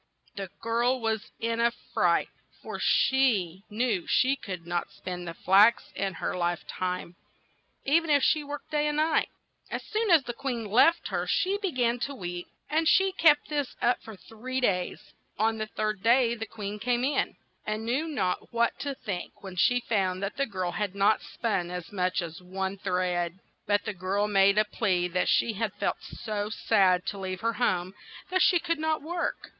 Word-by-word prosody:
The 195 -2 -5
girl 235 +3 +1
was 220 -2 -2
in 230 0 -1
a 235 0 +4 0.2
fright, - - +2 0.3
for - - -6
she 210 -10 +2
knew 215 -4 -1
she 265 +2 +3
could 185 -9 -7
not 175 0 -2
spin 180 -1 -7
the 170 -1 -6
flax 200 +7 +4
in 195 -1 -2
her - - -3
life 175 -1 -1
time, 180 -1 -4 0.7
e 290 +5 +5
ven 330 -1 -7
if 285 -2 +4
she 305 -1 +3
worked 290 0 -8
day 300 0 +1
and 295 0 -1
night. 315 +1 +2 0.4
As - - -4
soon 435 0 -1
as 330 -5 +6
the 240 - -5
queen 240 -3 -3
left 250 +11 +4
her - - -2
she 400 0 +1
be 395 -2 -1
gan 245 -3 +1
to 280 +3 -3
weep, 175 -4 -5 0.2
and 320 +1 +1
she 385 +3 +4
kept 310 -5 +4
this 290 -3 -2
up 245 - +2
for 220 - -10
three 245 +6 -5
days. 180 -8 -1 0.2
On 220 +1 +1
the 215 - -2
third 215 -2 -2
day 235 +1 +4
the 225 -1 -5
queen 210 -1 -6
came 240 +2 0
in, 275 +1 0 0.3
and 215 +1 -3
knew 265 +8 0
not 185 - -2
what 235 0 +1
to 280 -1 -3
think 200 -7 -6
when 190 -2 -8
she 245 +7 +3
found 190 -3 0
that 200 - -3
the 275 - 0
girl 185 -4 -3
had 205 -1 -3
not 200 +2 +4
yet - - -13
spun 195 -7 -1
as 180 -1 -6
much 185 -2 0
as 165 +1 -8
one 190 +1 -3
thread. 180 -2 -1 0.3
But 205 0 +2
the - - -2
girl 195 +3 -1
made 200 0 +4
a 215 - +5
plea 185 -4 0
that 180 +1 0
she 230 - +3
had 215 +1 -2
felt - - -2
so 210 -2 -4
sad 190 -5 +3
to 200 - -4
leave 185 -1 -4
her 230 0 +1
home 185 -6 0 0.4
that 370 0 +2
she 360 - +5
could 335 -1 -1
not 315 -1 0
work. 345 +2 -3
215 Hz, 195 wpm, -28 LUFS, 185-260 Hz, 0.7 s, as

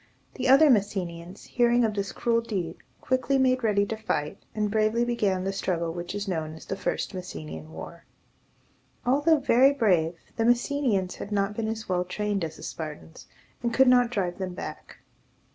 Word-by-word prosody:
The 255 -1 -2
other 275 +2 +7
Messenians, 185 -4 -1
hearing 240 0 +3
of 220 - 0
this 200 -1 -3
cruel 230 -1 +1
deed, 190 -7 -4 0.2
quickly 260 +1 +1
made 255 -1 +2
ready 205 -2 +3
to 220 - -3
fight, 150 -9 -3 0.2
and 210 -1 0
bravely 220 +2 +2
began 205 -6 0
the 195 +1 -2
struggle 170 -4 -1
which 175 +3 -5
is 205 0 -3
known 160 -4 -3
as 160 - -12
the - - -3
First 195 - -2
Messenian 80 - -7
War. 80 0 -9 1.0
Although 290 +6 +4
very 270 -1 +4
brave, 180 - +2 0.2
the 225 - +1
Messenians 240 -5 +1
had 205 - -7
not 200 0 0
been 225 0 -2
as 220 0 -4
well 180 -1 +1
trained 205 +1 -2
as 160 -1 -5
the - - -12
Spartans, 150 - -7 0.3
and 235 -1 -1
could 265 0 +6
not 245 -1 +5
drive 190 -6 -2
them 185 -2 -4
back. - - -8
205 Hz, 180 wpm, -27 LUFS, 180-240 Hz, 1.0 s, other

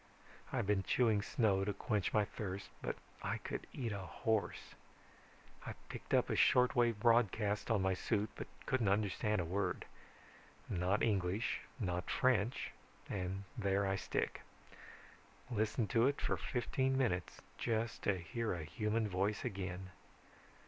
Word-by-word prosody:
I've - - 0
been 100 -1 +2
chewing 110 0 +3
snow 105 -5 +2
to 100 +1 0
quench 105 -2 0
my 105 -1 +3
thirst 100 -2 -5
but - - -2 0.3
I - - -1
could - - -5
eat 120 -4 -3
a 100 - -3
horse. 95 +3 -1 0.9
I - - -5 0.2
picked - - -8
up - - +4
a - - +2
short 125 +1 +5
wave 120 -3 +3
broadcast 105 -2 +3
on 105 -4 +3
my 95 0 +3
suit 105 +2 0
but - - -6 0.2
couldn't 125 -5 +1
understand 105 +1 +2
a - - -2
word. 95 +2 -1 0.8
Not 90 +3 +1
English, 100 0 +1 0.2
not 90 -4 -1
French, 125 -2 +2 0.4
and 95 0 -2
there 100 -4 +1
I 95 0 +1
stick. - - -2 1.1
Listened 110 0 0
to 120 0 +5
it 140 - 0
for - - +1
fifteen 130 +1 0
minutes 95 -10 0 0.2
just 115 0 -1
to 100 -2 +2
hear 110 +6 -2
a 85 - -4
human 105 +7 0
voice 100 +2 0
again. 95 -1 -4
105 Hz, 145 wpm, -37 LUFS, 95-115 Hz, 1.1 s, short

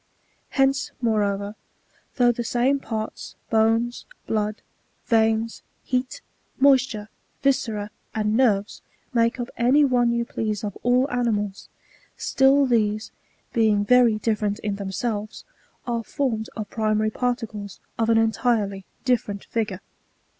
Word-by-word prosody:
Hence, 270 +2 +2
moreover, 205 -3 0 0.6
though 245 -1 +4
the 240 - -4
^BjnQ 245 +4 +1
parts, 220 -3 -5 0.2
bones, 225 +2 +2 0.2
blood, 215 -1 -2 0.4
veins, 225 0 +1 0.2
heat, 255 0 -2 0.4
moisture, 260 -6 +3 0.4
viscera, 225 -7 0 0.2
and 215 0 +1
nerves, 210 -5 +2 0.3
make 230 +1 +2
up 240 - -4
any 260 +5 +4
one 245 -3 +3
you 235 0 0
please 215 -3 -3
of 205 -3 -4
all 250 +2 +3
animals, 210 -5 -1 0.5
still 270 +1 +4
these, 215 -3 +1 0.4
being 215 -3 +3
very 245 -1 +5
different 210 -1 0
in 205 -1 -2
themselves, 205 +2 -4 0.4
are 235 -2 -2
formed 230 -5 -2
of 215 -2 -4
pri 215 -1 0
maiy 215 0 0
particles 225 -5 -3 0.2
of 225 0 +2
an 225 - +5
enHrely 220 -3 +1 0.2
different 220 -6 0
figure. 210 -4 -2
225 Hz, 120 wpm, -24 LUFS, 210-245 Hz, 0.6 s, very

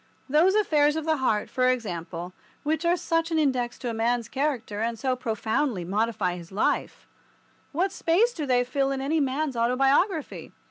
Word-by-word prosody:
Those 320 +8 +4
affairs 300 -8 +3
of 320 -1 -3
the 315 -1 +2
heart, 220 -6 0
for 255 0 +1
example, 180 -7 -3 0.3
which 315 +2 -1
are 345 +1 +3
such 330 -1 0
an 325 - 0
index 255 -5 0
to 250 - -4
a - - -5
man's 230 +1 0
character, 255 -7 -2
and 230 0 -1
so 255 +3 0
profoundly 225 -3 -1
modify 200 -2 -1
his 170 0 -11
life—what 325 - -3
space 385 +7 +2
do 305 -8 -4
they 245 -1 +3
fill 270 +2 0
in 275 -1 -2
any 295 +4 0
man's 275 0 -1
autobiography? 270 - +1
265 Hz, 170 wpm, -26 LUFS, 225-310 Hz, 0.3 s, Those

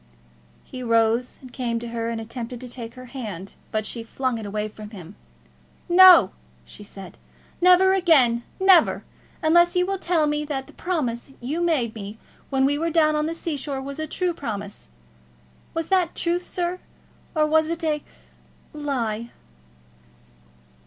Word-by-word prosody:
He 255 - -9
rose 230 +1 +1
and 255 -1 -12
came 235 -3 -2
to 235 0 -5
her, 230 0 -3
and 230 -1 -3
attempted 230 +2 -6
to 255 - -7
take 235 -1 -8
her 255 0 -10
hand, 200 -8 -6 0.2
but 215 -1 -2
she 230 - -3
flung 235 0 -3
away 210 +1 -3
from 215 0 -10
him. 190 -3 -11 0.7
"No!" 370 +1 +8 0.3
she - - -11
said 195 -2 -10 0.4
"never 365 +1 +6
again; 285 -11 +4 0.2
never, 380 -3 +5 0.4
unless 345 +3 +4
you 360 0 +3
will 390 0 -2
tell 340 -4 +1
me 295 0 0
that 280 -3 -4
the - - -17
promise 275 -9 -3
you 290 +8 -3
made 290 -10 +1
me 210 0 -8 0.3
when 265 -1 +2
we 290 +2 +1
were 335 +1 0
down 310 -2 +3
on 300 0 0
the 330 - -3
sea 330 -2 -3
shore 275 0 -4
was 275 +2 -7
a 315 - -3
true 360 +3 -1
promise. 205 - -6 0.9
Was 330 -1 -2
that 370 -3 +2
truth, 350 +1 -1
sir, 355 0 -2 0.6
or 305 -1 +3
was 315 +1 +3
it 335 +1 -3
a 305 -2 0 0.7
lie?" 240 -7 -3
270 Hz, 160 wpm, -24 LUFS, 230-330 Hz, 0.9 s, No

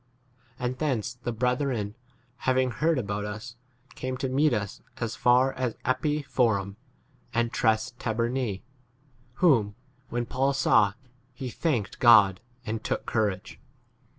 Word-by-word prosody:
And 125 +1 -3
thence 130 -5 -1
'the 120 0 -5
brethren, 125 -3 -1 0.4
having 130 0 +1
heard 160 +5 +1
about 100 -3 -2
us, 105 +3 -6 0.4
came 130 0 -4
to 130 +1 -2
meet 145 +4 +3
us 100 -4 -3 0.2
as 115 -2 -3
far 125 +2 +4
as 125 -3 -2
Appii 150 +3 0
Forum 110 -7 +1 0.6
and 120 0 +1
Tres 110 +2 +1
Tabernae, 115 -2 -1 0.7
whom, 120 - +3 0.3
when 120 +1 -2
Paul 135 +4 0
saw, 105 -7 +4 0.4
he 125 0 -5
thanked 125 - -1
God 110 -5 +6 0.2
and 110 0 -3
took - - -2
courage. 105 -5 -2
120 Hz, 125 wpm, -27 LUFS, 110-130 Hz, 0.7 s, God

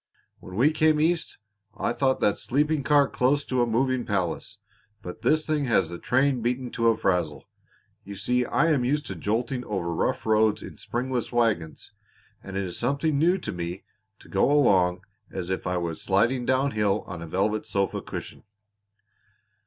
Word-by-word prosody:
"When 90 - -10
we 135 +9 +4
came 155 -1 +3
East 165 +2 0 0.4
I - - -1
thought 130 -1 +1
that 105 - +2
sleeping 150 +3 0
car 140 0 +4
close 140 +4 +1
to 130 -1 0
a 120 - +2
moving 130 +2 +1
palace; 100 +1 -2 0.5
but 90 +4 -8
this 155 +6 +2
thing 150 -2 0
has 95 -9 +2
the 85 0 -7
train 130 0 +1
beaten 125 +2 -2
to 115 -1 0
a 115 -1 +4
frazzle. 90 -9 -1 0.6
You 100 +1 -8
see 125 +5 0
I 165 +6 +2
am 140 -5 +2
used 145 +4 0
to 95 - -5
jolting 115 - -2
over 90 -5 -2
rough - - -1
roads 110 -1 +2
in - - -10
springless 125 0 -3
wagons, 110 -10 -1 0.5
and 100 0 -6
it 100 - -1
is 90 -2 -5
something 140 +4 0
new 175 +4 +3
to - - -5
me 90 +1 -5 0.3
to - - -18
go 100 +7 +2
along 95 -10 +3 0.3
as 90 +1 -4
if 95 - -3
I 90 0 0
was 85 -2 -3
sliding 120 +6 +1
down 130 +2 +2
hill 105 -1 0
on 85 -2 -7
a 85 - -7
velvet 105 +6 -1
sofa 100 -1 -1
cushion." - - -7
115 Hz, 180 wpm, -26 LUFS, 95-135 Hz, 0.6 s, we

